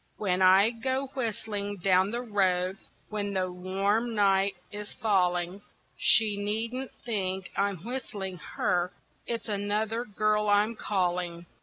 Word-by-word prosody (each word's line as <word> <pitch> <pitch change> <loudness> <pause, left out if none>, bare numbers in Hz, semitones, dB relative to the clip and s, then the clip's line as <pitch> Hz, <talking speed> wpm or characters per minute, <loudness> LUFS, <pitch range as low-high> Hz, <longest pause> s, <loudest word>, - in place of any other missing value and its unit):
When 185 -3 0
I 190 +4 +6
go 260 +3 -2
whistling 210 -5 -2
down 185 +1 +3
the 240 +3 -3
road, 190 -4 +1 0.3
when 205 -2 -3
the 185 -1 0
warm 200 +6 0
night 195 -1 +3 0.2
is 210 0 -6
falling, 185 -4 +1 0.3
She 215 -2 +5
needn't 225 +6 -2 0.2
think 190 -4 -2
I'm 200 -4 -1
whistling 205 -7 -4 0.2
her, 180 0 +1 0.3
it's 235 0 -3
another 210 +2 -1
girl 210 0 +1
I'm 205 +3 +3
calling. 175 -4 -1
205 Hz, 125 wpm, -28 LUFS, 185-220 Hz, 0.3 s, I